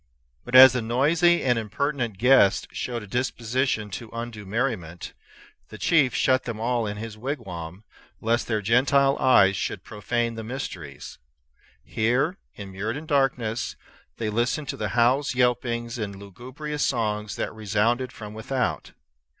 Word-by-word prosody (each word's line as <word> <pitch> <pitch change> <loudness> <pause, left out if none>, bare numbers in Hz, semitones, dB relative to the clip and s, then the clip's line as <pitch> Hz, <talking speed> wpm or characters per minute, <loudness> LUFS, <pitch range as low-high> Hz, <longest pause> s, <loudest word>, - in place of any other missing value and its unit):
But 125 - -4
as 130 0 +11
the 125 - -1
noisy 155 +10 +2
and 125 -3 +2
impertinent 120 0 -2
guests 125 -3 +4
showed 120 -3 -4
a - - -11
disposition 120 -1 -1
to 115 +4 -7
undue 115 -3 -7
merriment, 100 -7 -3 0.6
the - - -10
chief 145 -6 +2
shut 130 -1 +2
them 115 -3 -5
all 120 -1 0
in 105 0 -4
his 110 0 -7
wigwam, 95 - -6 0.4
lest 115 +2 0
their 110 -3 -1
Gentile 135 +5 +3
eyes 100 -7 +5
should - - -3
profane 115 +3 -2
the 115 0 -6
mysteries. 95 - -7 0.6
Here, 120 - 0 0.2
immured 100 +5 -5
in 155 - -8
darkness, 125 -6 0 0.4
they 110 -2 -2
listened 125 +6 -1
to - - -3
the 105 - -2
howls, 125 +3 +3
yelpings, 120 -1 0
and 100 -2 -4
lugubrious 130 +10 -7
songs 105 -5 -1
that - - -3
resounded 110 +4 0
from 105 -1 -9
without. 120 +4 -3
115 Hz, 140 wpm, -25 LUFS, 105-130 Hz, 0.6 s, as